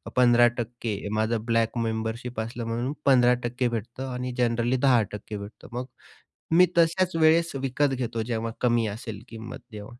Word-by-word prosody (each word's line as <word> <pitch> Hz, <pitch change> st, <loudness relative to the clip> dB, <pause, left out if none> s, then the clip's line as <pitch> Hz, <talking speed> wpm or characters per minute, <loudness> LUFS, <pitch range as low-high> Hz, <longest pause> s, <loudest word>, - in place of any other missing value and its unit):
15%. 120 Hz, -2 st, +3 dB, 0.2 s
माझं 110 Hz, 0 st, 0 dB
black 115 Hz, 0 st, +1 dB
membership 115 Hz, +1 st, -3 dB
असलं 115 Hz, +1 st, -4 dB
म्हणून 120 Hz, +5 st, -2 dB
15% 125 Hz, -1 st, +3 dB
भेटतं 120 Hz, +3 st, -5 dB
आणि 125 Hz, 0 st, -3 dB
जनरली 120 Hz, +1 st, +1 dB
10% 105 Hz, -3 st, +1 dB
भेटतं. 100 Hz, +2 st, -10 dB
मग 125 Hz, +1 st, -3 dB, 0.7 s
मी 180 Hz, +1 st, +8 dB
तशाच 170 Hz, +2 st, +3 dB
वेळेस 165 Hz, +1 st, +4 dB
विकत 135 Hz, +1 st, 0 dB
घेतो, 115 Hz, -3 st, -2 dB
जेव्हा 115 Hz, 0 st, -3 dB
कमी 120 Hz, -2 st, +2 dB
असेल 110 Hz, -2 st, -8 dB
किंमत 115 Hz, +1 st, -8 dB
तेव्हा. 105 Hz, -1 st, -8 dB
120 Hz, 140 wpm, -26 LUFS, 115-125 Hz, 0.7 s, मी